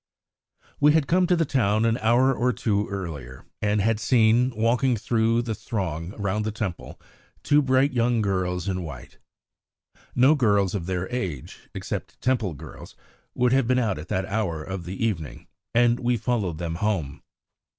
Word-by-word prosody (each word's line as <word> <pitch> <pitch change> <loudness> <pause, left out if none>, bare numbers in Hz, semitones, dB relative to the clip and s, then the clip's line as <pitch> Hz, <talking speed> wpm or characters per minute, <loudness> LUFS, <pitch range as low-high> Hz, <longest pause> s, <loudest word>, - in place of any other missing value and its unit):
We 150 +1 +5
had 160 -3 +3
come 180 +4 +2
to 180 - +3
the 165 -1 +1
town 110 -5 +1
an 115 +1 +1
hour 120 +4 +3
or 125 0 +1
two 105 -3 -1
earlier, 80 -10 -7 0.2
and 105 0 +1
had 110 +1 +1
seen, 115 +3 +3
walking 120 +3 +2
through 115 +2 +1
the 115 -2 -3
throng 95 -5 -4
round 100 +1 -1
the 110 - -2
Temple, 100 -6 -5 0.4
two 150 0 +4
bright 130 +1 +2
young 120 -1 +2
girls 95 -3 -1
in 95 -1 -1
white. 70 -8 -9 1.0
No 130 +4 +6
girls 100 - +2
of 90 -5 -3
their 95 0 -2
age, 90 - -5
except - - -5
Temple 115 -10 0
girls, - - -11 0.4
would 125 0 +2
have 135 -3 +2
been 130 0 +2
out 110 -9 0
at 80 - -9
that 95 +1 -1
hour 95 -6 -2
of 95 0 -6
the 95 +5 -3
evening, 85 -9 -4 0.3
and 120 0 +4
we 120 0 +1
followed 105 -8 -1
them 85 0 -4
home. 80 -9 -1
110 Hz, 170 wpm, -25 LUFS, 95-125 Hz, 1.0 s, No